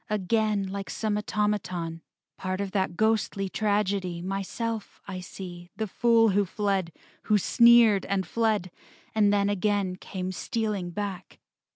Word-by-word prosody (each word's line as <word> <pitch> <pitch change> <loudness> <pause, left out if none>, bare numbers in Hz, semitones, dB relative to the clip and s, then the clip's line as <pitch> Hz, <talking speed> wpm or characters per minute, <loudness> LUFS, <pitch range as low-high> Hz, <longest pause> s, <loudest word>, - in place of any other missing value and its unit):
Again, 210 0 +1
like 195 0 -5
some 215 -2 -1
automaton, 195 -6 -2 0.3
Part 185 0 -3
of 200 -1 -3
that 190 -3 -1
ghostly 215 -3 +1
tragedy, 200 -4 0
Myself 200 +3 -4
I 185 -2 -5
see, 175 -1 -9
the 220 - -2
fool 230 +2 +3
who 200 +1 +3
fled, 195 -2 -1 0.3
Who 215 - +4
sneered 235 0 +5
and 195 -1 0
fled. 215 -5 0 0.4
And 210 -2 +4
then 200 -1 +2
again 200 -2 0
Came 185 -1 -5
stealing 210 -2 -2
back. 200 0 -5
200 Hz, 135 wpm, -27 LUFS, 185-215 Hz, 0.4 s, sneered